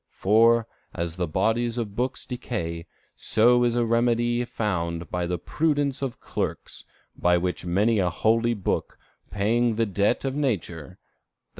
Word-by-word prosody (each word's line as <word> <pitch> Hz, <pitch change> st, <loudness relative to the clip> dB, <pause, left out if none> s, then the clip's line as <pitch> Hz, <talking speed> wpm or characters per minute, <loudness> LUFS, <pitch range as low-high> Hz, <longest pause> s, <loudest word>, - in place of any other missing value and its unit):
For, 115 Hz, +3 st, +3 dB, 0.3 s
as 85 Hz, -1 st, -3 dB
the 90 Hz, -1 st, -1 dB
bodies 115 Hz, +8 st, 0 dB
of 105 Hz, -4 st, -4 dB
books 130 Hz, +3 st, -2 dB
decay, 85 Hz, -10 st, -5 dB, 0.3 s
so 120 Hz, +2 st, +3 dB
a 120 Hz, 0 st, +2 dB
remedy 120 Hz, +1 st, +1 dB
is 120 Hz, -, -5 dB
found 85 Hz, -6 st, -2 dB
out -, -, -20 dB
by 90 Hz, -1 st, -1 dB
the 90 Hz, 0 st, -1 dB
prudence 145 Hz, -, -1 dB
of 135 Hz, -4 st, -4 dB
clerks, -, -, -5 dB, 0.3 s
by 90 Hz, 0 st, +3 dB
which 90 Hz, +1 st, -2 dB
a 100 Hz, +1 st, +2 dB
holy 115 Hz, +6 st, +1 dB
book 100 Hz, -, -2 dB, 0.3 s
paying 115 Hz, +3 st, +1 dB
the 115 Hz, +1 st, +1 dB
debt 100 Hz, +5 st, 0 dB
of 135 Hz, -, -1 dB
nature 90 Hz, -, -3 dB
[_i. -, -, -49 dB
110 Hz, 150 wpm, -25 LUFS, 90-120 Hz, 0.3 s, For